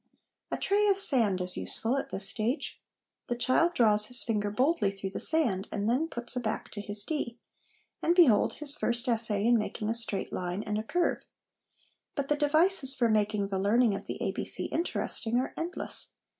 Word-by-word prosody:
A -, -, -2 dB
tray 415 Hz, +1 st, +1 dB
of 395 Hz, -1 st, +3 dB
sand 235 Hz, -, +2 dB
is 180 Hz, 0 st, -1 dB
useful 230 Hz, +4 st, -2 dB
at 275 Hz, -, -3 dB
this 195 Hz, 0 st, -2 dB
stage. 235 Hz, +8 st, -3 dB, 0.5 s
The 240 Hz, -, -2 dB
child 295 Hz, +8 st, +2 dB
draws 215 Hz, -6 st, +3 dB
his 250 Hz, +1 st, -2 dB
finger 210 Hz, -3 st, -1 dB
boldly 250 Hz, 0 st, +1 dB
through 195 Hz, -1 st, -6 dB
the -, -, -5 dB
sand, 235 Hz, -13 st, +5 dB
and 205 Hz, +1 st, -2 dB
then 260 Hz, +8 st, +1 dB
puts 240 Hz, -4 st, -5 dB
a -, -, 0 dB
back 220 Hz, -3 st, -4 dB
to 205 Hz, -, -6 dB
his 205 Hz, 0 st, -2 dB
D; 245 Hz, -4 st, -4 dB, 0.6 s
and 340 Hz, -, +2 dB
behold, 270 Hz, -, +5 dB
his 295 Hz, -1 st, -3 dB
first 240 Hz, -1 st, +1 dB
essay 220 Hz, -3 st, +1 dB
in 235 Hz, 0 st, +4 dB
making 210 Hz, 0 st, -3 dB
a -, -, +1 dB
straight 225 Hz, -4 st, -1 dB
line 180 Hz, +3 st, -3 dB
and 210 Hz, 0 st, -2 dB
a -, -, -4 dB
curve. 350 Hz, +9 st, 0 dB, 1.0 s
But 280 Hz, -2 st, -3 dB
the 295 Hz, -, +3 dB
devices 295 Hz, -1 st, +2 dB
for 240 Hz, -3 st, +1 dB
making 210 Hz, -2 st, 0 dB
the 190 Hz, -1 st, -2 dB
learning 220 Hz, +3 st, +3 dB
of 195 Hz, -, -6 dB
the -, -, -4 dB
'ABC' -, -, -2 dB
interesting 240 Hz, -8 st, -2 dB
are 255 Hz, -, -2 dB
endless. 340 Hz, +3 st, -2 dB
235 Hz, 190 wpm, -29 LUFS, 210-285 Hz, 1.0 s, sand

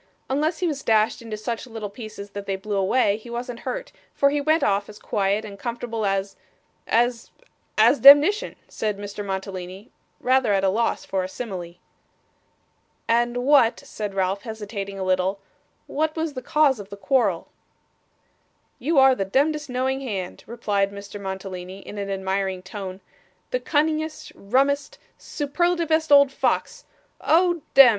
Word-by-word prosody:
'Unless 305 Hz, +4 st, +1 dB
he 360 Hz, -, 0 dB
was 290 Hz, -4 st, -2 dB
dashed 220 Hz, -1 st, +2 dB
into 225 Hz, -2 st, -6 dB
such 230 Hz, +3 st, -4 dB
little 225 Hz, -3 st, -5 dB
pieces 215 Hz, -2 st, -9 dB
that 200 Hz, -1 st, -7 dB
they 195 Hz, -, 0 dB
blew 205 Hz, +2 st, -4 dB
away, 200 Hz, +2 st, +2 dB
he 225 Hz, +2 st, -13 dB
wasn't 240 Hz, 0 st, -5 dB
hurt, -, -, -5 dB, 0.2 s
for 280 Hz, 0 st, +3 dB
he 290 Hz, 0 st, 0 dB
went 310 Hz, +3 st, +2 dB
off 200 Hz, +1 st, +1 dB
as 210 Hz, -, -11 dB
quiet 205 Hz, +1 st, 0 dB
and 200 Hz, -2 st, -10 dB
comfortable 235 Hz, -3 st, -3 dB
as 195 Hz, 0 st, -1 dB, 0.5 s
as 240 Hz, 0 st, +1 dB, 0.5 s
as 235 Hz, +6 st, +5 dB
demnition,' 290 Hz, +10 st, +7 dB
said 210 Hz, -2 st, -3 dB
Mr. 205 Hz, 0 st, -6 dB
Mantalini, 190 Hz, +1 st, -6 dB, 0.3 s
rather 255 Hz, -4 st, +2 dB
at 195 Hz, -1 st, +1 dB
a 195 Hz, -, +4 dB
loss 230 Hz, +4 st, 0 dB
for 190 Hz, -1 st, -1 dB
a 185 Hz, -, -5 dB
simile. 185 Hz, -6 st, -6 dB, 1.3 s
'And 240 Hz, +1 st, +1 dB
what,' 275 Hz, -5 st, +4 dB
said 205 Hz, -2 st, -6 dB
Ralph, 190 Hz, +1 st, 0 dB
hesitating 205 Hz, -3 st, -6 dB
a 190 Hz, -, -3 dB
little, 185 Hz, +1 st, +1 dB, 0.5 s
'what 310 Hz, +1 st, -1 dB
was 320 Hz, -2 st, -2 dB
the 255 Hz, -, -5 dB
cause 285 Hz, -2 st, +3 dB
of 200 Hz, -1 st, -9 dB
quarrel?' 260 Hz, +3 st, +1 dB, 1.3 s
'You 310 Hz, +4 st, 0 dB
are 265 Hz, 0 st, +7 dB
the 225 Hz, -, -1 dB
demdest, 295 Hz, +9 st, 0 dB
knowing 260 Hz, +2 st, -1 dB
hand,' 195 Hz, -8 st, -5 dB
replied 205 Hz, -4 st, -1 dB
Mr. 200 Hz, 0 st, -9 dB
Mantalini, 190 Hz, -1 st, -6 dB
in 205 Hz, -, -8 dB
an 200 Hz, 0 st, -4 dB
admiring 190 Hz, -1 st, -2 dB
tone, 190 Hz, 0 st, -7 dB, 0.5 s
'the -, -, +1 dB
cunningest, 310 Hz, -3 st, -1 dB
rummest, 275 Hz, +7 st, 0 dB, 0.2 s
superlativest 320 Hz, +1 st, 0 dB
old 280 Hz, -1 st, +7 dB
fox -, -, -1 dB, 0.4 s
oh 345 Hz, 0 st, +3 dB
dem! 270 Hz, -2 st, +10 dB
225 Hz, 150 wpm, -24 LUFS, 195-275 Hz, 1.3 s, dem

